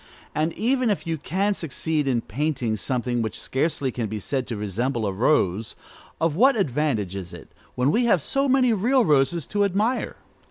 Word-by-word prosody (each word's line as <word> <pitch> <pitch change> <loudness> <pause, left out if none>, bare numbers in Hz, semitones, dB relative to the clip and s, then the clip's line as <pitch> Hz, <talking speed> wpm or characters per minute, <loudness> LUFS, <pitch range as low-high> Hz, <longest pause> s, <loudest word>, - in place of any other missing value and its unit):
And 155 +2 0
even 255 +1 +1
if 205 - -1
you 165 -2 -2
can 195 +7 0
succeed 155 -3 -2
in 125 -3 +1
painting 130 -2 -2
something 120 +1 -1
which 110 -1 -3
scarcely 135 -1 -1
can 115 -2 -3
be 110 +1 -4
said 130 +5 -2
to 115 - -4
resemble 110 +4 -2
a 100 - 0
rose, 110 -2 +1 0.4
of 165 -2 +1
what 265 +9 +5
advantage 130 - 0
is 95 -3 -6
it, - - -12 0.2
when 125 +3 +2
we 240 +7 +2
have 205 -7 +4
so 275 - 0
many 255 -2 +4
real 240 +5 +2
roses 150 +2 +2
to 205 0 0
admire? 205 +6 0
150 Hz, 185 wpm, -24 LUFS, -, 0.4 s, what